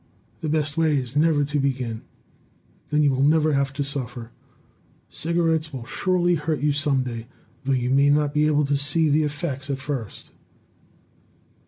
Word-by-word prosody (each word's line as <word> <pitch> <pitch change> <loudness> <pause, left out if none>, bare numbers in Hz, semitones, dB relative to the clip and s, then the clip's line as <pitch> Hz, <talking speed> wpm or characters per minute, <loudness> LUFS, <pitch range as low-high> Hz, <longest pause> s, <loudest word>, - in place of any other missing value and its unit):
The 155 - -3
best 150 0 0
way 160 -3 +3
is 125 0 -4
never 150 -1 +3
to 145 +1 -1
begin; 125 -5 -2 0.9
then 150 0 +2
you 145 - +4
will 130 0 0
never 155 +1 +3
have 140 0 +1
to 140 0 -2
suffer. 125 -4 -5 0.8
Cigarettes 160 0 0
will 130 -4 -7
surely 175 +4 +1
hurt 155 -2 -1
you 150 0 +2
some 140 -2 +1
day, 115 -2 -6 0.4
though 135 - +1
you 125 -1 0
may 140 +1 +4
not 145 0 +2
be 150 0 +3
able 150 -1 +2
to 140 0 +1
see 150 +3 +1
the 150 +2 +3
effects 145 -2 -3
at 140 - -1
first." 130 -6 -6
145 Hz, 170 wpm, -24 LUFS, 135-155 Hz, 0.9 s, you